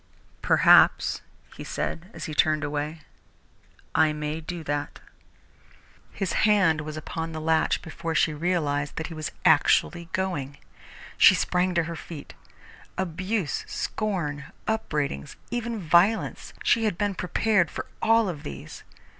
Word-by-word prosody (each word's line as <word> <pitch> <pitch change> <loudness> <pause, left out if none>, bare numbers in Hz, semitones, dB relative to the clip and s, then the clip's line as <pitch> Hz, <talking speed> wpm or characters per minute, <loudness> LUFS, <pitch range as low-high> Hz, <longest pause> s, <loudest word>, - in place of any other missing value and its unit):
"Perhaps," - - +5 0.3
he - - -8
said, 175 +3 -4
as - - -7
he 155 - -5
turned 155 0 +2
away, 150 +2 -3 0.9
"I 155 -1 +4
may 150 +1 -4
do 170 +1 -6
that." 145 -1 -3 1.1
His 195 -3 -3 0.2
hand 185 -7 +4
was 155 0 -6
upon 160 +1 -5
the 160 - -4
latch 160 0 +1
before 165 -1 -5
she 155 - +3
realized 150 -3 -1
that 160 - -3
he - - -7
was 155 -1 -4
actually 170 -1 +3
going. 145 -8 -2 0.6
She - - +8
sprang 180 0 0
to 170 - +3
her 170 +1 -5
feet. 160 -1 -9 0.6
Abuse, 185 0 -2
scorn, 160 -10 -3 0.2
upbraidings, 150 - -2 0.2
even 235 -2 -2
violence 180 +5 +2
she 230 -2 +3
had 205 -6 0
been 205 0 0
prepared 190 -1 +1
for - - -5 0.2
all 225 -1 +4
of 165 -6 -4
these. 70 -1 -9
165 Hz, 135 wpm, -26 LUFS, 150-190 Hz, 1.1 s, She